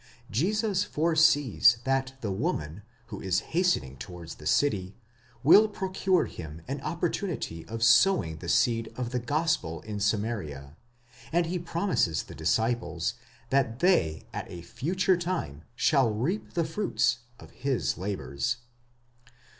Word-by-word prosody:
Jesus 200 Hz, -, +1 dB
foresees 155 Hz, -, +4 dB
that 135 Hz, 0 st, 0 dB
the 105 Hz, -, -2 dB
woman, 95 Hz, -, -2 dB, 0.3 s
who 100 Hz, -, -6 dB
is 95 Hz, +1 st, +1 dB
hastening 160 Hz, -, +1 dB
towards 85 Hz, +4 st, -8 dB
the 75 Hz, -, -5 dB
city, 100 Hz, -, +1 dB, 0.5 s
will 205 Hz, +10 st, +8 dB
procure 190 Hz, -2 st, 0 dB
him 80 Hz, -1 st, -9 dB
an -, -, -4 dB
opportunity 80 Hz, 0 st, -3 dB
of 115 Hz, 0 st, -4 dB
sowing 115 Hz, -, +4 dB
the 85 Hz, +1 st, -7 dB
seed 115 Hz, +4 st, +2 dB
of 125 Hz, -2 st, -3 dB
the 125 Hz, -, 0 dB
gospel 145 Hz, -, -1 dB
in 105 Hz, -1 st, -6 dB
Samaria, 100 Hz, -10 st, -2 dB, 0.6 s
and 170 Hz, +1 st, +2 dB
he 175 Hz, +2 st, -2 dB
promises 170 Hz, -, 0 dB
the -, -, -11 dB
disciples 90 Hz, +3 st, 0 dB, 0.4 s
that 130 Hz, -4 st, +2 dB
they 130 Hz, -, +2 dB
at -, -, -5 dB
a 85 Hz, -1 st, -8 dB
future 175 Hz, -, 0 dB
time 170 Hz, -, -3 dB
shall 130 Hz, -1 st, +3 dB
reap 135 Hz, -, -2 dB
the 170 Hz, -2 st, +1 dB
fruits 155 Hz, -, 0 dB, 0.2 s
of -, -, -13 dB
his 135 Hz, -2 st, -1 dB
labours. 70 Hz, -, -2 dB
120 Hz, 130 wpm, -28 LUFS, -, 0.6 s, will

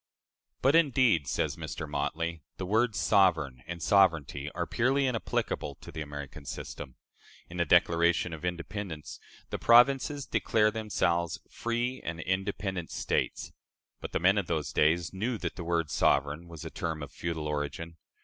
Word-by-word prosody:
"But, 135 Hz, +2 st, +5 dB
indeed," 130 Hz, -, +4 dB
says -, -, -1 dB
Mr. 80 Hz, -, -5 dB
Motley, 80 Hz, +3 st, -2 dB, 0.2 s
"the 95 Hz, -, -4 dB
words 110 Hz, +2 st, +2 dB
'sovereign' 80 Hz, -, +3 dB
and 85 Hz, -2 st, -5 dB
'sovereignty' 80 Hz, -8 st, +3 dB
are -, -, -2 dB
purely 135 Hz, +3 st, +1 dB
inapplicable 115 Hz, -, -2 dB
to -, -, -12 dB
the 80 Hz, -, -6 dB
American 75 Hz, 0 st, -7 dB
system. 70 Hz, -1 st, -7 dB, 0.6 s
In 90 Hz, -, -7 dB
the 85 Hz, -, +2 dB
Declaration 85 Hz, +1 st, +3 dB
of 80 Hz, -, -8 dB
Independence 90 Hz, -1 st, -5 dB, 0.3 s
the -, -, -3 dB
provinces 135 Hz, +4 st, +5 dB
declare 105 Hz, -1 st, +2 dB
themselves 85 Hz, -7 st, 0 dB
'free 120 Hz, +2 st, -2 dB
and 85 Hz, 0 st, -4 dB
independent 95 Hz, 0 st, -2 dB
States,' -, -, -2 dB, 0.5 s
but -, -, -7 dB
the -, -, 0 dB
men 95 Hz, +4 st, +4 dB
of 95 Hz, -, -3 dB
those 80 Hz, -3 st, -2 dB
days 80 Hz, +3 st, +2 dB
knew 110 Hz, +5 st, -1 dB
that -, -, -4 dB
the 90 Hz, -, -6 dB
word 85 Hz, -2 st, 0 dB
'sovereign' 75 Hz, +4 st, +1 dB
was 85 Hz, -3 st, -9 dB
a -, -, -6 dB
term 80 Hz, -2 st, -3 dB
of -, -, -8 dB
feudal 80 Hz, -2 st, -4 dB
origin. 75 Hz, +3 st, -4 dB
85 Hz, 155 wpm, -29 LUFS, 80-105 Hz, 0.6 s, But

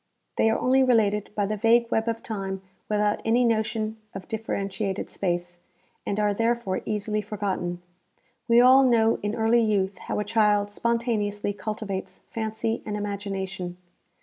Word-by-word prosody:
They 225 Hz, -, +4 dB
are 225 Hz, -, +2 dB
only 265 Hz, +1 st, +3 dB
related 210 Hz, -5 st, +2 dB
by 205 Hz, -, +1 dB
the 215 Hz, +2 st, -1 dB
vague 230 Hz, +3 st, +3 dB
web 225 Hz, +1 st, +1 dB
of 230 Hz, 0 st, -2 dB
time 195 Hz, -3 st, -4 dB, 0.3 s
without 210 Hz, 0 st, +1 dB
any 235 Hz, +2 st, +3 dB
notion 220 Hz, -1 st, 0 dB, 0.2 s
of 190 Hz, -1 st, -7 dB
differentiated 200 Hz, -2 st, -3 dB
space, 175 Hz, -1 st, -2 dB, 0.5 s
and 200 Hz, -, -1 dB
are 210 Hz, -1 st, +2 dB
therefore 230 Hz, -2 st, 0 dB
easily 210 Hz, 0 st, -1 dB
forgotten, 190 Hz, -4 st, -3 dB, 0.7 s
^\^e 235 Hz, +1 st, +7 dB
all 260 Hz, +1 st, +8 dB
know 230 Hz, -3 st, +3 dB
in 210 Hz, +2 st, -2 dB
early 225 Hz, +1 st, +3 dB
youth 200 Hz, -4 st, 0 dB
how -, -, -4 dB
a -, -, 0 dB
child 210 Hz, -2 st, +2 dB
spontaneously 210 Hz, -3 st, -1 dB
cultivates 205 Hz, -1 st, -5 dB
fancy 220 Hz, 0 st, -2 dB
and 210 Hz, -1 st, -3 dB
imagination. 195 Hz, -3 st, -4 dB
210 Hz, 150 wpm, -26 LUFS, 200-225 Hz, 0.7 s, all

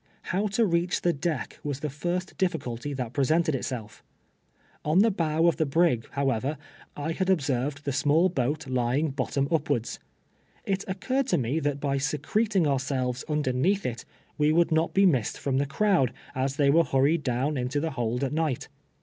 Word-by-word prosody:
How 200 Hz, +4 st, +1 dB
to 230 Hz, -, +4 dB
reach 175 Hz, -1 st, 0 dB
tho 175 Hz, -, +4 dB
deck 150 Hz, -3 st, -3 dB
M'as 145 Hz, -1 st, -3 dB
the 150 Hz, -, -2 dB
first 175 Hz, +5 st, -3 dB
dithcidty 145 Hz, -7 st, -2 dB
that 125 Hz, -3 st, -4 dB
presented 155 Hz, +3 st, +2 dB
itself. 120 Hz, -4 st, -5 dB, 0.8 s
On 155 Hz, +3 st, +1 dB
the 225 Hz, +1 st, +4 dB
bow 165 Hz, -3 st, +1 dB
of 170 Hz, -, +3 dB
the 160 Hz, -, +2 dB
bi'ig, 140 Hz, -6 st, +2 dB
however, 140 Hz, +1 st, 0 dB, 0.4 s
I 145 Hz, +3 st, -2 dB
had 185 Hz, +3 st, -1 dB
observed 145 Hz, -4 st, 0 dB
the 140 Hz, -, 0 dB
small 145 Hz, +6 st, +3 dB
1)oat 145 Hz, 0 st, -1 dB
lying 130 Hz, +4 st, 0 dB
bottom 135 Hz, +1 st, -1 dB
upwards. 140 Hz, -7 st, 0 dB, 0.7 s
It 195 Hz, 0 st, -1 dB
occurred 260 Hz, +8 st, -1 dB
to -, -, +2 dB
me 130 Hz, +5 st, 0 dB
that 145 Hz, -2 st, -1 dB
by 140 Hz, -1 st, 0 dB
secreting 180 Hz, +7 st, 0 dB
ourselves 130 Hz, -3 st, -1 dB
underneath 150 Hz, +6 st, +1 dB
it, 120 Hz, -2 st, -3 dB, 0.4 s
we 150 Hz, +1 st, +4 dB
would 170 Hz, +1 st, +3 dB
not 160 Hz, +1 st, +1 dB
be 195 Hz, +1 st, +5 dB
missed 130 Hz, -, +2 dB
from 135 Hz, -2 st, -1 dB
the 140 Hz, -, 0 dB
crowd, 170 Hz, -, +2 dB, 0.2 s
as 135 Hz, +1 st, -1 dB
they 140 Hz, -1 st, +3 dB
were 165 Hz, +3 st, +5 dB
hun 135 Hz, -4 st, +1 dB
ied 155 Hz, +3 st, +3 dB
down 130 Hz, +3 st, -1 dB
into 130 Hz, +2 st, -1 dB
the 160 Hz, +2 st, -2 dB
liold 120 Hz, -1 st, -2 dB
at 135 Hz, -, -1 dB
night. 155 Hz, -5 st, -1 dB
145 Hz, 180 wpm, -27 LUFS, 130-170 Hz, 0.8 s, be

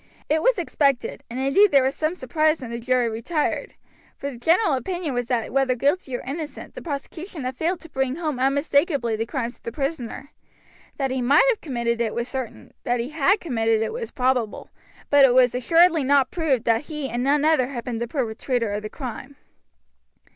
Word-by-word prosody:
It 310 Hz, +1 st, +2 dB
was -, -, +3 dB
expected, 280 Hz, -6 st, 0 dB
and 240 Hz, +2 st, -5 dB
indeed 275 Hz, +11 st, +4 dB
there 275 Hz, -5 st, +5 dB
was 265 Hz, +1 st, +1 dB
some 310 Hz, +4 st, -1 dB
surprise 310 Hz, +2 st, +1 dB
when 250 Hz, -4 st, -7 dB
the 235 Hz, -, -4 dB
jury 250 Hz, 0 st, +1 dB
retired, 230 Hz, +8 st, -2 dB, 0.4 s
for 280 Hz, -, -4 dB
the 245 Hz, -, -10 dB
general 335 Hz, -, +3 dB
opinion 345 Hz, +2 st, -2 dB
was 245 Hz, -1 st, -2 dB
that 240 Hz, -3 st, -1 dB
whether 265 Hz, -2 st, +2 dB
guilty 275 Hz, 0 st, 0 dB
or -, -, -9 dB
innocent 300 Hz, +3 st, -6 dB
the -, -, -8 dB
prosecution 315 Hz, +2 st, -6 dB
had 255 Hz, +1 st, -3 dB
failed 335 Hz, +6 st, -1 dB
to 330 Hz, -, -11 dB
bring 265 Hz, -2 st, -1 dB
home 305 Hz, -5 st, -3 dB
unmistakably 280 Hz, -2 st, +1 dB
the 225 Hz, +1 st, -3 dB
crime 240 Hz, -1 st, -3 dB
to -, -, -25 dB
the 230 Hz, -, -5 dB
prisoner. 275 Hz, 0 st, -4 dB, 0.7 s
That 270 Hz, -2 st, -1 dB
he 260 Hz, 0 st, -1 dB
might 280 Hz, -, +5 dB
have 465 Hz, -, 0 dB
committed 235 Hz, -5 st, -1 dB
it 225 Hz, -2 st, -1 dB
was 235 Hz, +1 st, -2 dB
certain, 260 Hz, -4 st, -6 dB
that 245 Hz, 0 st, 0 dB
he 235 Hz, +3 st, -3 dB
had 320 Hz, +7 st, +2 dB
committed 225 Hz, -8 st, +1 dB
it -, -, -3 dB
was 465 Hz, -1 st, -4 dB
probable, 250 Hz, -5 st, -1 dB, 0.4 s
but 285 Hz, -1 st, +7 dB
it 255 Hz, -2 st, +6 dB
was 250 Hz, -2 st, +5 dB
assuredly 330 Hz, +5 st, +4 dB
not 270 Hz, -1 st, +3 dB
proved 290 Hz, -9 st, 0 dB
that 230 Hz, +4 st, +1 dB
he 300 Hz, -3 st, -4 dB
and 240 Hz, +1 st, -2 dB
none 285 Hz, +2 st, +2 dB
other 310 Hz, -6 st, +3 dB
had 250 Hz, -3 st, -6 dB
been 240 Hz, -3 st, -4 dB
the 235 Hz, -, -2 dB
perpetrator 235 Hz, -3 st, -2 dB
of 205 Hz, -, -2 dB
the 215 Hz, -, -6 dB
crime. 260 Hz, +2 st, -7 dB
270 Hz, 205 wpm, -23 LUFS, 245-310 Hz, 0.7 s, but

